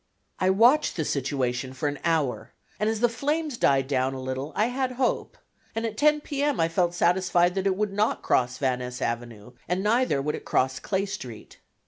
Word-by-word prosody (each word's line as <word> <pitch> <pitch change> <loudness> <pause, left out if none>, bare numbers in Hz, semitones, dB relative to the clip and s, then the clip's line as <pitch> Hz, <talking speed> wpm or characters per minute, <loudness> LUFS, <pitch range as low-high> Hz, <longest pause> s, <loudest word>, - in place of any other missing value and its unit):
I 185 - +2
watched 240 +10 +4
the 160 - -1
situation 130 -2 -2
for 130 +3 -2
an 145 0 -3
hour, 160 -6 0 0.3
and 210 +1 +1
as 220 -1 -2
the 240 - +5
flames 295 +5 -2
died 135 - +2
down 135 -1 0
a - - -5
little 130 +3 -4
I 215 - +3
had 255 0 -2
hope, 255 0 -1 0.4
and 225 0 -1
at 220 -1 -3
10 300 +4 +3
P. 285 -1 -4
M. 290 -1 +1
I 165 0 +2
felt 175 +1 +1
satisfied 175 0 +3
that 195 0 -1
it 190 - +2
would 210 -1 -1
not 210 +2 0
cross 125 0 +1
Van 130 -2 0
Ness 125 0 -6
Avenue, 115 -2 -4 0.2
and 180 +2 -1
neither 225 - +2
would 150 +2 -1
it - - -6
cross 130 0 0
Clay 195 0 -1
Street. 130 - -8
175 Hz, 205 wpm, -26 LUFS, -, 0.4 s, the